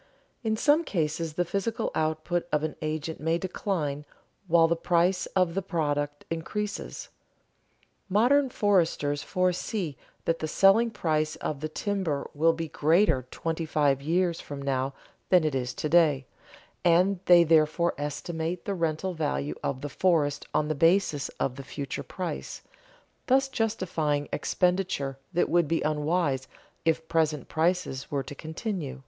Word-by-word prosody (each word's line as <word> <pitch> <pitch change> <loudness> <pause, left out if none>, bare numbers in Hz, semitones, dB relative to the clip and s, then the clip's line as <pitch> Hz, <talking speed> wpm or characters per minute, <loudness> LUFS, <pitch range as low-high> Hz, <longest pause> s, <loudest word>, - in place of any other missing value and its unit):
In 220 -2 0
some 300 +6 +4
cases 160 - -2
the 175 +3 0
physical 200 +5 -2
output 155 +2 -1
of 150 0 +1
an 155 - -2
agent 155 +1 -3
may 160 +2 +1
decline 170 -6 -2 0.4
while 165 -1 +5
the 170 - +1
price 175 +2 +1
of 180 -3 +3
the 195 - -1
product 145 -5 -2
increases. 205 +6 -4 1.0
Modern 255 +8 +4
foresters 165 -10 +1
foresee 185 -2 -1 0.3
that 165 0 +1
the 155 - -2
selling 195 +8 +5
price 155 -7 -1
of 145 - -4
the 155 +2 -4
timber 185 -5 -2
will 165 +3 +3
be 165 0 -4
greater 155 - +2
twenty 165 0 -3
five 145 -3 +1
years 170 +3 0
from 145 -1 -7
now 135 -1 -1 0.3
than 180 -3 +5
it 155 -2 0
is 125 -2 -1
to - - -2
day, 150 -4 +4 0.6
and 180 +3 +4
they 175 -1 +8
therefore 165 +1 +3
estimate 160 +4 -3
the 200 - -1
rental 170 +1 -1
value 75 - -2
of 130 -1 -2
the 145 - -3
forest 150 -3 +1
on 150 - +1
the 155 - 0
basis 165 -2 +2
of 130 0 -1
the 135 - -6
future 140 +1 -5
price, 175 -5 -5 0.6
thus 270 +1 +4
justifying 185 - -1
expenditure 180 -7 0
that 175 -1 +2
would 175 -2 +2
be 165 +2 0
unwise 150 -2 0 0.4
if 160 0 +1
present 155 -4 0
prices 165 -5 0
were 140 -2 -1
to - - -8
continue. 160 - -5
165 Hz, 145 wpm, -27 LUFS, 145-180 Hz, 1.0 s, they